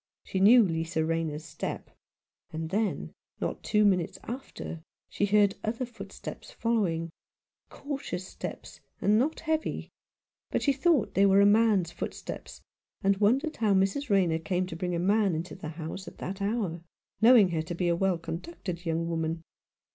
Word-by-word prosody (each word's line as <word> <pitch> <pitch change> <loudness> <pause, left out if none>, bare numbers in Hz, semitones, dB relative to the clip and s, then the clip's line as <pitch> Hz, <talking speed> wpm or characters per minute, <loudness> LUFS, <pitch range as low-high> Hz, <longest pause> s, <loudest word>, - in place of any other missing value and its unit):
She 190 - -3
knew: 225 +5 +8
Lisa 165 -2 -1
Rayner's 160 -1 -2
step; 160 0 -5 0.6
and 160 +1 -4
then, 210 +1 -1 0.3
not - - -3
two 210 -1 +3
minutes 180 -4 +2
after, 240 -9 -6 0.3
she 205 - 0
heard 205 -1 +4
other 230 +4 -1
footsteps 245 - -9
following 200 - 0 0.3
— - - -56
cautious 275 -11 -5
steps, - - -8 0.2
and 210 +2 +4
not 300 +6 0
heavy; 315 -1 -2 0.6
but - - -1
she 280 - +3
thought 290 - +2
they 200 +1 +5
were 195 0 +5
a 200 - +7
man's 205 -4 +4
footsteps, - - -7 0.4
and 195 0 +3
wondered 255 +10 +2
how 210 -3 +3
Mrs. 195 +9 +1
Rayner 180 -5 +3
came 180 +2 -1
to 180 - -7
bring 180 +1 -2
a - - -1
man 200 0 +2
into 165 +3 -4
the 165 -4 -7
house 165 +4 -6
at - - -10
that 195 +2 -5
hour, 200 -5 -1 0.4
knowing 225 -4 +7
her 165 -2 0
to 160 +2 -5
be 175 0 0
a 170 - +3
well 190 0 +1
conducted 170 - -6
young 165 +1 0
woman. 165 0 -2
190 Hz, 165 wpm, -29 LUFS, 165-220 Hz, 0.6 s, knew